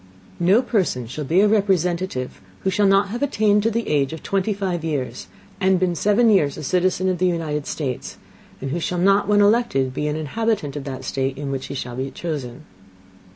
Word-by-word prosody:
No 190 +8 +4
Person 185 - 0
shall 140 +6 -6
be 170 +7 +3
a 210 - +5
Representative 185 -9 0 0.2
who 190 - 0
shall 205 +1 +3
not 195 +1 +3
have 240 +4 -4
attained 215 -7 +2
to 225 - +1
the 230 +1 -2
Age 140 -1 +1
of 160 - -8
twenty 195 +2 0
five 190 -5 -2
Years, 145 -5 -3 0.3
and 190 -1 +3
been 180 -1 +1
seven 210 +6 +3
Years 150 -9 +2
a - - -6
citizen 185 +4 +1
of 185 -2 0
the 185 - +3
United 155 -4 -2
States, 135 -5 -4 0.4
and 135 0 -4
who 170 - -1
shall 180 +2 -2
not, 195 +3 +3
when 205 0 +4
elected, 205 - +2
be 150 +3 -2
an 150 - -1
Inhabitant 155 -1 -2
of 145 -2 -5
that 130 -2 -6
State 135 0 -2
in 140 -1 -4
which 135 -1 -4
he - - -6
shall 125 -2 -5
be 135 +1 -2
chosen. 145 -4 -6
175 Hz, 205 wpm, -22 LUFS, 140-200 Hz, 0.4 s, a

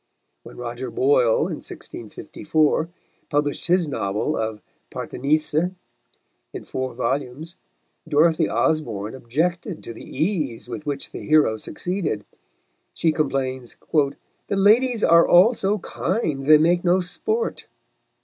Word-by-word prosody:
When - - -13
Roger - - -5
Boyle, 475 +5 +3
in - - -5
1654, 155 +1 -2 0.4
published 145 +1 -1
his 175 -1 +3
novel 110 +2 -1
of 110 -1 -3 0.3
Parthenissa, 155 +5 0 0.8
in - - -7
four 130 -2 -4
volumes, 135 +6 -3 0.5
Dorothy 160 +2 +3
Osborne 115 -10 0
objected 160 - -2
to 115 - -7
the - - -11
ease 155 - -2
with 155 - -7
which 140 -1 -3
the - - -7
hero 155 -7 +3
succeeded; 170 - -3 0.7
she 165 - +2
complains 130 -5 -2 0.2
"the 145 -3 +3 0.4
ladies 225 +4 +4
are 170 0 +6
all 185 +8 +6
so 205 -2 0
kind 165 - -2
they 155 0 +9
make 175 +3 +2
no 180 +1 +3
sport." 435 - -3
155 Hz, 120 wpm, -23 LUFS, 135-180 Hz, 0.8 s, they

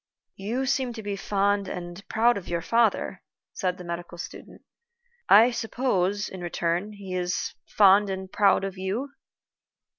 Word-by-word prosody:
"You 230 +7 -2
seem 260 -2 0
to 220 -2 -8
be 205 -1 -3
fond 200 0 0
and 175 +1 -7
proud 235 +2 +3
of 195 - -6
your 170 -1 -2
father," 230 -2 +1 0.3
said 180 -2 -2
the 180 - -9
medical 175 0 -6
student. - - -10 0.7
"I 225 +4 +8
suppose, 210 -4 0
in 185 - -8
return, 175 +4 -2
he 195 -2 -8
is 180 0 -2
fond 200 0 +5
and 190 0 -5
proud 200 -2 +3
of 195 -1 -5
you?" 215 +9 -3
195 Hz, 150 wpm, -26 LUFS, 180-220 Hz, 0.7 s, I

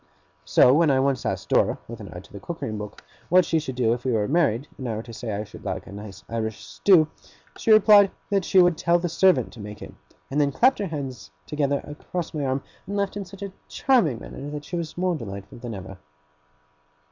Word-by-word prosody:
So, 75 +12 +6
when 160 +1 +4
I 135 -1 +3
once 135 -2 +1
asked - - -3
Dora, - - +3
with - - -8
an - - -9
eye - - -8
to - - -19
the - - -7
cookery - - -5
book, 105 -1 -7 0.3
what 180 0 +6
she 160 -1 +1
would 130 -4 -5
do, 120 -2 +2
if 120 0 -5
we 130 - 0
were 105 -2 +1
married, 145 -5 +1
and 130 -2 -4
I 110 - -2
were 110 - -4
to 115 - -11
say 115 0 -5
I 105 +1 -2
should 105 - -12
like - - -4
a - - -11
nice 100 -1 -9
Irish 110 -2 -4
stew, 175 -6 +4 0.5
she - - -4
replied 210 -2 +7 0.2
that 195 -2 +2
she 190 - +1
would 175 -2 +4
tell 170 0 +3
the 175 0 -2
servant 170 - +3
to 120 - -12
make 105 0 -8
it; - - -9 0.4
and 145 +2 +2
then 140 -1 +2
clapped 255 - +3
her 205 - -1
little 160 -5 -4
hands 130 - -6 0.2
together 145 -2 0
across 160 +3 -5
my 150 -2 -2
arm, 130 +1 -1 0.2
and 200 +1 -3
laughed 200 -1 -1
in 200 -1 -4
such 195 +2 -10
a 200 -1 -6
charming 230 - +2
manner 140 +5 -8
that 150 0 -6
she 180 - -5
was 170 -2 -4
more 180 0 +1
delightful 100 -6 -8
than 120 -2 -6
ever. 95 0 -9
140 Hz, 240 wpm, -25 LUFS, 115-175 Hz, 0.5 s, replied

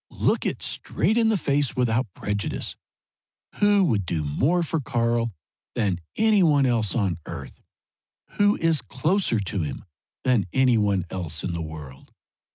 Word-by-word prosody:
Look - - 0
it - - -4
straight 205 +8 0
in 230 -1 +3
the 220 - +2
face 145 -4 0
without 120 -3 0
prejudice. 105 -1 -3 0.8
Who 205 -1 +4
would 110 - +1
do 80 -3 -2
more 140 - +1
for 165 0 -1
Karl 115 -3 0 0.4
than 100 -7 0 0.2
any 215 -2 +4
one 145 -5 +4
else 115 -6 +1
on 95 -7 0
earth? - - -8 0.7
Who 205 0 +3
is 165 -4 +2
closer 130 - 0
to 100 -1 -2
him 75 +3 -5 0.4
than 125 -7 +2
any 130 -3 +4
one 100 -4 +1
else 80 -5 -3
in 90 - -2
the 85 - -3
world? 75 -4 -9
120 Hz, 155 wpm, -25 LUFS, 95-160 Hz, 0.8 s, Who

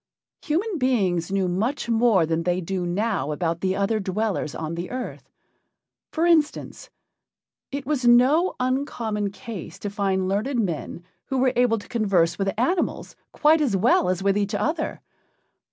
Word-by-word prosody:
Human 355 +4 -1
beings 190 -10 +1
knew 195 -1 +1
much 220 +10 -1
more 225 -6 +3
than 165 +1 -1
they 180 +1 0
do 185 0 -3
now 185 -5 -1
about 165 +2 -2
the 190 0 0
other 200 +3 0
dwellers 195 -5 -2
on 160 0 -4
the 170 +2 -5
earth. 255 0 -6 0.8
For 330 +1 0
instance, 320 -4 +1 0.8
it 280 -1 -4
was 265 -3 0
no 265 +9 +5
uncommon 245 -5 -1
case 205 -3 -8
to 205 - -5
find 195 -2 0
learned 215 +8 -1
men 170 -3 -3 0.2
who 265 - -2
were 260 0 +2
able 240 -2 +3
to 205 - -10
converse 195 -8 +1
with 195 0 +1
animals 340 +10 -1 0.2
quite 310 +1 +4
as 240 -10 +1
well 190 -2 +3
as 185 +1 -1
with 200 +1 +2
each 200 -1 -1
other. 315 +1 -2
210 Hz, 155 wpm, -24 LUFS, 185-255 Hz, 0.8 s, no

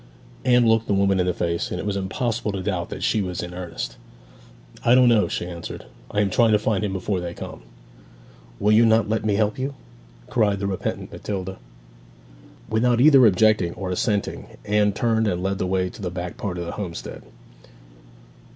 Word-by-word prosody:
Anne 125 -2 +4
looked 115 0 +3
the 100 - +2
woman 100 -1 +2
in 90 - +1
the - - +3
face, 85 0 -1
and 90 - -4
it - - -5
was 100 -1 -1
impossible 110 +3 -2
to 95 -2 -4
doubt 90 -4 -2
that - - -6
she 110 - +2
was 90 -3 -3
in 90 0 -7
earnest. 85 -9 -6 0.9
'I 120 - +5
don't 125 -1 +6
know,' 110 -3 +4
she - - -3
answered. 85 -1 -7 0.2
'I 105 - 0
am 100 - +1
trying 115 +2 +4
to - - +6
find 105 -1 0
him 105 - -1
before 95 0 -2
they 85 -1 -5
come.' - - -8 1.0
'Will 105 - +3
you 110 +2 +6
not 110 -1 +4
let 110 +1 -1
me 105 -2 +1
help 105 +2 0
you?' 135 +2 -3 0.5
cried 105 -4 +1
the 100 - -3
repentant 95 -2 -3
Matilda. 95 -4 -5 1.1
Without 120 +2 +2
either 135 -1 +7
objecting 105 -3 +3
or 95 -2 -4
assenting 100 +2 -1 0.2
Anne 105 0 +2
turned 110 +1 +1
and 90 -2 -1
led 95 0 -1
the 95 - -1
way 95 0 0
to - - -12
the 90 - -2
back 90 0 -5
part 95 -4 -4
of 85 - -4
the 85 - -4
homestead. 90 -5 -6
100 Hz, 195 wpm, -23 LUFS, 90-110 Hz, 1.1 s, either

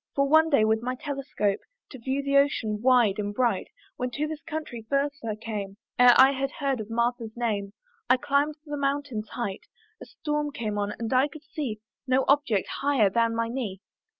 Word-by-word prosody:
For 275 0 +2
one 315 +2 +5
day 250 -8 +4
with 220 0 +2
my 250 +2 -2
telescope, 255 -8 -2 0.3
To 265 - -9
view 265 +4 -2
the 280 0 0
ocean 225 -7 +2
wide 240 -5 +4
and 205 0 -2
bright, 245 -1 +1 0.3
When 250 0 -2
to 285 +5 -2
this 310 0 -5
country 300 -8 -6
first 280 0 0
I 220 -2 -2
came, 210 -3 -5 0.2
Ere 245 -1 +8
I 265 +1 +8
had 275 0 -1
heard 275 -3 -1
of 215 0 -6
Martha's 235 -1 -1
name, 205 -4 -2 0.4
I 255 - +6
climbed 285 +3 +1
the 295 -1 -4
mountain's 275 -6 -2
height: 205 -6 -5 0.3
A - - -9
storm 295 -1 -2
came 210 -4 -3
on, 205 0 -1
and 230 +1 -3
I 260 +3 +4
could 305 0 -12
see 290 -9 -5 0.3
No 260 +1 +3
object 275 -9 +2
higher 270 -8 +3
than 230 +1 +2
my 230 0 0
knee. 230 -6 -4
250 Hz, 195 wpm, -27 LUFS, 220-280 Hz, 0.4 s, Ere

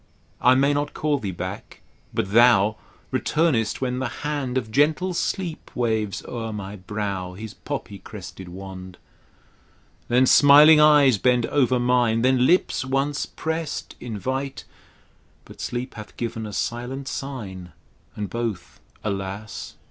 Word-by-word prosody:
I 125 +1 +6
may 140 +2 +3
not 145 +1 -2
call 150 -2 0
thee 100 - -4
back; 95 +2 -7 0.3
but 95 - -2
thou 110 -2 +5 0.3
Returnest 140 -10 +1
when 125 -1 -1
the 130 - -1 0.2
hand 140 -4 -1
Of 110 -4 -3
gentle 155 +8 +2
Sleep 175 -1 -3
waves 110 -5 -1
o'er 115 -2 -5
my 100 -1 -6
brow 95 -1 -4
His 110 +2 -8
poppy - - -6
crested 95 -2 -10
wand; 95 0 -9 1.1
Then 125 +2 +4
smiling 145 +3 +8
eyes 145 -7 +6
bend 125 0 +3
over 130 -3 +2
mine, 120 -2 +2
Then 130 0 +4
lips 180 -6 +2
once 135 +2 -1
prest 160 -1 -4
invite; 130 +4 -4 0.8
But - - -12
Sleep 125 +2 -4
hath 105 -1 -11
given 115 -2 -4
a 105 - -8
silent 125 +6 -3
sign 100 -12 -6 0.4
And 105 -1 -3
both, 115 -7 -4 0.2
alas 100 +1 -5
120 Hz, 135 wpm, -24 LUFS, 105-140 Hz, 1.1 s, smiling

